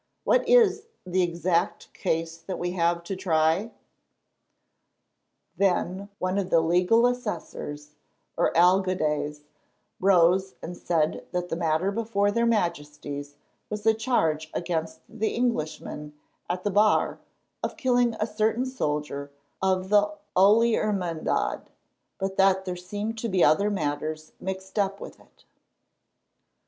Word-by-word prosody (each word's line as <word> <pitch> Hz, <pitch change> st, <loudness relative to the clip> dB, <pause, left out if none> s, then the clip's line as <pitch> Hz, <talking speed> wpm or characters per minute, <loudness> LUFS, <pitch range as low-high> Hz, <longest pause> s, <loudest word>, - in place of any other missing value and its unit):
"What -, -, +2 dB
is 440 Hz, -3 st, +4 dB, 0.2 s
the 185 Hz, +1 st, +1 dB
exact 175 Hz, +1 st, -1 dB
case 165 Hz, -3 st, -2 dB
that 170 Hz, +3 st, -6 dB
we 175 Hz, 0 st, -2 dB
have 170 Hz, -1 st, 0 dB
to 190 Hz, +3 st, -4 dB
try?" 170 Hz, +2 st, +1 dB, 1.9 s
Then 195 Hz, +1 st, 0 dB
one 185 Hz, +2 st, -1 dB
of 190 Hz, -2 st, -3 dB
the 165 Hz, -, +5 dB
legal 180 Hz, +8 st, +3 dB
assessors, 160 Hz, -11 st, -4 dB, 0.4 s
or -, -, +2 dB
alcaldes, 165 Hz, -5 st, +2 dB, 0.6 s
rose 190 Hz, 0 st, +3 dB
and 175 Hz, -, -7 dB
said 160 Hz, -3 st, -1 dB
that 180 Hz, 0 st, -2 dB
the -, -, -1 dB
matter 165 Hz, +3 st, 0 dB
before 205 Hz, -2 st, 0 dB
their 235 Hz, +2 st, +1 dB
Majesties 150 Hz, -8 st, -2 dB, 0.3 s
was 210 Hz, 0 st, -5 dB
a 220 Hz, -, +6 dB
charge 165 Hz, -10 st, 0 dB
against 165 Hz, -2 st, -3 dB
the 220 Hz, -1 st, -2 dB
Englishman 155 Hz, -9 st, -3 dB, 0.3 s
at 180 Hz, +1 st, -2 dB
the 205 Hz, -, 0 dB
bar 210 Hz, +2 st, +3 dB, 0.4 s
of -, -, -4 dB
killing 245 Hz, -5 st, +2 dB
a 215 Hz, -, +1 dB
certain 220 Hz, +3 st, 0 dB
soldier 150 Hz, -, -3 dB, 0.3 s
of 190 Hz, 0 st, +1 dB
the 205 Hz, 0 st, +4 dB, 0.2 s
Holy 215 Hz, +5 st, +5 dB
Hermandad, 185 Hz, -7 st, -1 dB, 0.5 s
but 195 Hz, 0 st, -3 dB
that 190 Hz, 0 st, +3 dB
there 180 Hz, -1 st, -3 dB
seemed 205 Hz, +5 st, -5 dB
to 230 Hz, -, -2 dB
be 185 Hz, -3 st, +3 dB
other 200 Hz, +7 st, +4 dB
matters 155 Hz, -3 st, -3 dB
mixed 190 Hz, +2 st, -5 dB
up 200 Hz, 0 st, 0 dB
with -, -, -10 dB
it. -, -, -25 dB
185 Hz, 130 wpm, -26 LUFS, 165-210 Hz, 1.9 s, a